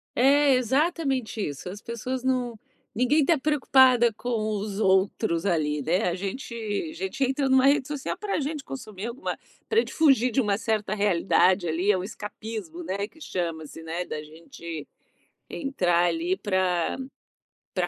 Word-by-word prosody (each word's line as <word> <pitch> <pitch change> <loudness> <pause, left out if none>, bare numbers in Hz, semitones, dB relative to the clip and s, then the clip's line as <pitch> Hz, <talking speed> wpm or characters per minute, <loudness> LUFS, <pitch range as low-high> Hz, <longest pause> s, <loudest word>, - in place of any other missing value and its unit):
É, 280 +2 +5
exatamente 265 -1 0
isso. 145 +4 -6
As 200 +3 -8
pessoas 250 +2 -4
não 250 -3 -1 0.3
ninguém 255 +7 +3
tá 330 -2 +3
preocupada 260 -4 +4
com 245 - -6 0.3
os 200 0 -4
outros 190 -3 +2
ali, 150 -5 +1
né, 180 +7 +1
a - - -1
gente 200 +7 -5 0.4
a - - -10
gente 190 +8 -3
entra 270 +1 +1
numa 265 0 +5
rede 275 -1 +4
social 295 +3 -4
pra 400 -1 -2
gente 290 0 -4
consumir 215 -6 -7
alguma 240 +5 -4 0.3
pra 445 - +4
gente - - -2
fugir 270 -6 +4
de 250 +3 +2
uma 205 -4 +1
certa 215 -2 -1
realidade 190 -2 +3
ali. 170 +5 0
É 195 - +2
o 180 - -3
escapismo, 210 -4 -7
né, 195 +4 -3
que 315 +8 -21
chama-se, 165 - -4
né, 165 +2 -3
da 155 - -5
gente 165 - -9 0.6
entrar 180 - +1
ali 335 - 0
pra 185 -4 0 0.8
pra - - 0
220 Hz, 160 wpm, -26 LUFS, 180-265 Hz, 0.8 s, É